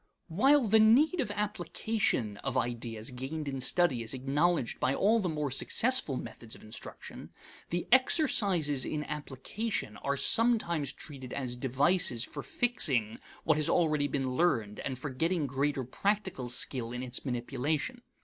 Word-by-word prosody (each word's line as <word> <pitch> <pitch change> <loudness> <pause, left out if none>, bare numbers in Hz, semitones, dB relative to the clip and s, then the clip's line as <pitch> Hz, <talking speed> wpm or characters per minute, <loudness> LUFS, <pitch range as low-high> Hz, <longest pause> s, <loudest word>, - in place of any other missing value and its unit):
While 270 - +4
the 220 +2 +5
need 270 +11 +5
of 245 - -3
application 205 - -2
of 130 - -3
ideas 115 -2 -3
gained 140 +5 -5
in 135 -1 -3
study 140 -2 +2
is 115 +3 -3
acknowledged 140 +2 0
by 130 +2 +1
all 220 +4 +3
the 185 -4 -1
more 150 -3 -2
successful 225 - +3
methods 115 -2 -7
of - - -15
instruction, 110 +1 -9 0.4
the 175 +1 -2
exercises 200 - +3
in 150 +2 -3
application 150 - -4
are 140 +5 -2
sometimes 195 - +2
treated 130 -4 -10
as 125 -3 -3
devices 135 0 +2
for 145 - -6
fixing 135 - 0 0.2
what 155 -1 +2
has 155 - +1
already 155 -4 +2
been 135 -2 -2
learned 125 -8 0
and 130 -2 -4
for 140 +2 -5
getting 165 +4 0
greater 140 0 -1
practical 190 - -2
skill 120 -1 +1
in 125 +1 -5
its 125 0 -4
manipulation. 140 - -2
145 Hz, 150 wpm, -30 LUFS, 130-190 Hz, 0.4 s, the